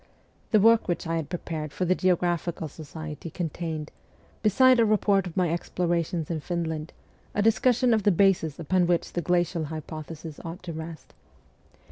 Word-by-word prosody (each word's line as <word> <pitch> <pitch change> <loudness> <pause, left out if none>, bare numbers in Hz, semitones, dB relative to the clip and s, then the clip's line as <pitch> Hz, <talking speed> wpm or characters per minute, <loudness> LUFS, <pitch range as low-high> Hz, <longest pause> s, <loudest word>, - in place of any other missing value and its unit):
The 215 - +5
work 225 +2 +5
which 175 -1 -1
I 165 0 -1
had 155 -3 -4
prepared 160 -4 -4
for 185 - -2
the 180 - +3
Geographical 175 -3 0
Society 155 +1 -8
contained, 160 -2 -4 0.5
beside 255 +4 +5
a - - +6
report 205 -3 +2
of 175 - -9
my 180 -3 +2
explorations 170 -1 -1
in 160 - -1
Finland, 160 -1 -3 0.4
a 205 - +2
discussion 245 +2 +3
of 220 - +3
the 205 - +3
bases 175 -5 +2
upon 175 +2 +2
which 175 -1 0
the 175 - -1
glacial 175 -1 +1
hypothesis 155 0 -7
ought 170 +1 -7
to 170 -2 -5
rest. 160 0 -8
170 Hz, 160 wpm, -26 LUFS, 160-185 Hz, 0.5 s, a